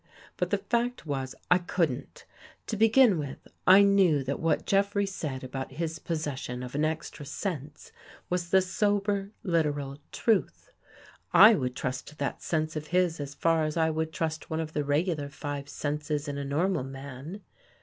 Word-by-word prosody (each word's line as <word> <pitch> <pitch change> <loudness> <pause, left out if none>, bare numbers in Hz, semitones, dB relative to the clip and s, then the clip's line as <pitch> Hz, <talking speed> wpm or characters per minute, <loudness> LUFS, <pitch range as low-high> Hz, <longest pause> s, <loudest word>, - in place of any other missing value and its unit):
But - - -1
the - - +2
fact 240 -3 -1
was 135 -3 -3 0.2
I 180 - +7
couldn't. 165 -7 -2 0.4
To 220 - -3
begin 225 -2 +5
with, 140 -3 -6 0.2
I 190 +2 +9
knew 190 -8 +4
that 135 +2 -3
what 160 -2 +1
Jeffrey 200 +1 +2
said 150 -9 -4
about 130 +1 -5
his 165 +2 -3
possession 140 -6 -4
of 125 - -7
an 150 +2 0
extra 155 -1 -3
sense 150 -2 -5 0.4
was 175 -1 -2
the 190 +1 +5
sober, 200 0 0
literal 145 -5 0
truth. 225 -4 0 0.6
I 220 +2 +10
would 125 -9 -1
trust 130 +3 -4
that 140 - -3
sense 155 -1 -1
of 155 0 -4
his 180 -2 +1
as 140 0 -5
far 165 0 +2
as 155 +1 -2
I 160 -1 +3
would 160 0 -2
trust 160 -1 -3
one 160 - -2
of 160 -1 -4
the 150 - 0
regular 145 0 0
five 145 -1 -5
senses 150 0 -2
in 140 0 -3
a - - -3
normal 160 +3 0
man. 135 +7 -8
155 Hz, 170 wpm, -28 LUFS, 140-185 Hz, 0.6 s, I